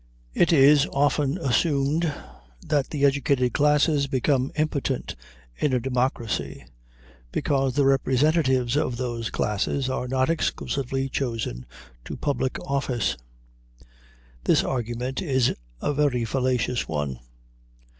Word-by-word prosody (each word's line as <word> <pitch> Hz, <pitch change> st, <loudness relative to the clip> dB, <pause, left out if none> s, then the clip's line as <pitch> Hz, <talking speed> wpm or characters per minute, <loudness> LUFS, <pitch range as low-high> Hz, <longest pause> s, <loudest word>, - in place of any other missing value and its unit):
It 175 Hz, -, +3 dB
is 145 Hz, -1 st, +6 dB
often 145 Hz, 0 st, +1 dB
assumed 145 Hz, +5 st, +1 dB, 0.5 s
that 145 Hz, -3 st, 0 dB
the 145 Hz, -2 st, +1 dB
educated 135 Hz, -3 st, +2 dB
classes 150 Hz, 0 st, +3 dB
become 135 Hz, 0 st, +1 dB
impotent 145 Hz, -, -2 dB, 0.4 s
in 140 Hz, -, 0 dB
a 125 Hz, -, +3 dB
democracy, 125 Hz, -, -2 dB, 0.7 s
because 135 Hz, -2 st, 0 dB
the 145 Hz, -, +3 dB
representatives 135 Hz, -1 st, +2 dB
of 130 Hz, -5 st, 0 dB
those 120 Hz, -2 st, -3 dB
classes 130 Hz, +6 st, -1 dB
are 125 Hz, -, -2 dB
not 130 Hz, +1 st, +1 dB
exclusively 135 Hz, -4 st, -1 dB
chosen 115 Hz, -, -3 dB, 0.4 s
to -, -, -6 dB
public 140 Hz, -3 st, -1 dB
office. 130 Hz, -5 st, -1 dB, 1.3 s
This -, -, +4 dB
argument 125 Hz, +1 st, -3 dB
is 130 Hz, -6 st, +1 dB, 0.3 s
a 145 Hz, -, 0 dB
very 140 Hz, -5 st, +1 dB
fallacious 125 Hz, 0 st, 0 dB
one. 75 Hz, -5 st, -3 dB
135 Hz, 110 wpm, -25 LUFS, 125-145 Hz, 1.3 s, is